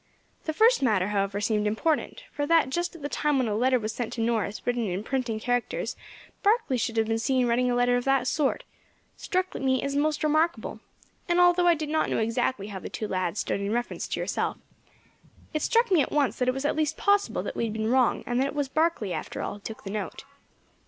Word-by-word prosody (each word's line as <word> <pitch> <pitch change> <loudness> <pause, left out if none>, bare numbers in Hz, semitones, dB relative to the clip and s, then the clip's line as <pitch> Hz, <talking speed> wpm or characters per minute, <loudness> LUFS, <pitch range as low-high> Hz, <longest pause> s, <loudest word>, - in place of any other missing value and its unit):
The 315 - 0
first 455 +9 +4
matter, 205 -7 +2
however, 200 -1 0
seemed 210 0 +1
important, 310 - -1
for 290 0 -2
that 325 -5 +3
just 345 +3 -2
at 320 - -11
the - - -1
time 295 -1 0
when 255 -3 +1
a 210 - -1
letter 255 +4 +3
was 220 -2 -3
sent 240 -1 -4
to 230 - -3
Norris 225 -2 -1
written 245 -2 0
in 185 +2 -3
printing 240 -3 -2
characters 245 +1 -1 0.5
Barkley 420 - +2
should 230 -1 -2
have 225 - +3
been 225 +1 0
seen 255 +1 +2
writing 245 +1 +2
a 245 - +1
letter 245 0 +3
of 245 - -3
that 270 -2 +2
sort, 280 +1 0 0.5
struck 370 -1 -2
me 260 -1 0
as 280 0 -2
most 300 +2 +1
remarkable; 310 +3 +1 0.5
and 345 +1 +3
although 355 0 +5
I 345 - +6
did 305 -1 -4
not 315 0 +1
know - - 0
exactly 225 -1 -1
how 195 -2 -6
the - - -7
two 215 - -4
lads 185 0 -1
stood 200 - -2
in 200 +2 -1
reference 240 +1 -2
to - - -3
yourself, - - -1 1.0
it 310 - -1
struck 465 +4 +2
me 350 -5 +5
at - - -2
once 290 -3 +1
that 250 - +1
it 255 - +3
was 270 +2 -3
at - - +1
least 310 -1 0
possible 405 -1 +2
that - - -5
we - - 0
had 220 - -3
been 220 +1 -1
wrong, 255 -2 +3
and 245 0 0
that 270 - +2
it 280 - -6
was 285 -2 -1
Barkley 310 - 0
after - - -4
all - - -3
who 205 - -10
took 220 +2 -8
the 195 - -6
note. 210 0 -5
255 Hz, 235 wpm, -27 LUFS, 220-305 Hz, 1.0 s, I